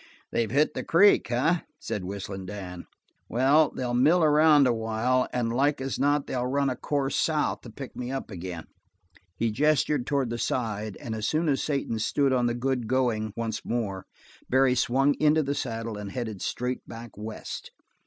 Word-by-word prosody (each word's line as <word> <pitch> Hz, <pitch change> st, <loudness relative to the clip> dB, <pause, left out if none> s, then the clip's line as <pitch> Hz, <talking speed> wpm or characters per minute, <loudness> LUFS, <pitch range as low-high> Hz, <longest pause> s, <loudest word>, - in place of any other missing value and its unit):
"They've 115 Hz, -2 st, 0 dB
hit 150 Hz, +4 st, +2 dB
the -, -, -4 dB
creek, 185 Hz, -, +5 dB
eh?" 150 Hz, +9 st, +2 dB, 0.2 s
said 100 Hz, -, -4 dB
Whistling 95 Hz, 0 st, -6 dB
Dan. 90 Hz, -3 st, -7 dB, 0.4 s
"Well, 140 Hz, +5 st, +4 dB
they'll 125 Hz, -1 st, -3 dB
mill 155 Hz, +8 st, +4 dB
around 150 Hz, -1 st, +6 dB
a 125 Hz, -, +3 dB
while 115 Hz, +3 st, 0 dB
and 115 Hz, -2 st, -1 dB
like 140 Hz, +3 st, +2 dB
as 135 Hz, 0 st, -3 dB
not 145 Hz, 0 st, +2 dB
they'll 125 Hz, -1 st, -2 dB
run 140 Hz, +1 st, +1 dB
a -, -, -3 dB
course 140 Hz, +1 st, -1 dB
south 155 Hz, -2 st, 0 dB
to 120 Hz, -, -11 dB
pick 130 Hz, +4 st, -9 dB
me 125 Hz, 0 st, -4 dB
up 135 Hz, -4 st, -5 dB
agin." 90 Hz, -3 st, -6 dB, 0.7 s
He 115 Hz, -1 st, 0 dB
gestured 150 Hz, +1 st, +1 dB
toward 140 Hz, -5 st, 0 dB
the 120 Hz, -, -3 dB
side, 110 Hz, -5 st, -2 dB
and 115 Hz, -, -5 dB
as 110 Hz, -1 st, -2 dB
soon 160 Hz, +2 st, +1 dB
as 140 Hz, -3 st, +1 dB
Satan 140 Hz, -6 st, -1 dB
stood 135 Hz, +5 st, +1 dB
on 125 Hz, -1 st, +2 dB
the 120 Hz, -, -1 dB
good 125 Hz, -1 st, -1 dB
going 115 Hz, -4 st, 0 dB
once 110 Hz, -1 st, -3 dB
more, 100 Hz, -5 st, -3 dB, 0.4 s
Barry 130 Hz, 0 st, +4 dB
swung 135 Hz, +3 st, +2 dB
into 155 Hz, +1 st, +4 dB
the 140 Hz, 0 st, -1 dB
saddle 115 Hz, -6 st, -4 dB
and 100 Hz, -1 st, -6 dB
headed 110 Hz, -6 st, -4 dB
straight 125 Hz, +1 st, -2 dB
back 115 Hz, -1 st, -9 dB
west. 110 Hz, +1 st, -7 dB
125 Hz, 185 wpm, -27 LUFS, 110-140 Hz, 0.7 s, around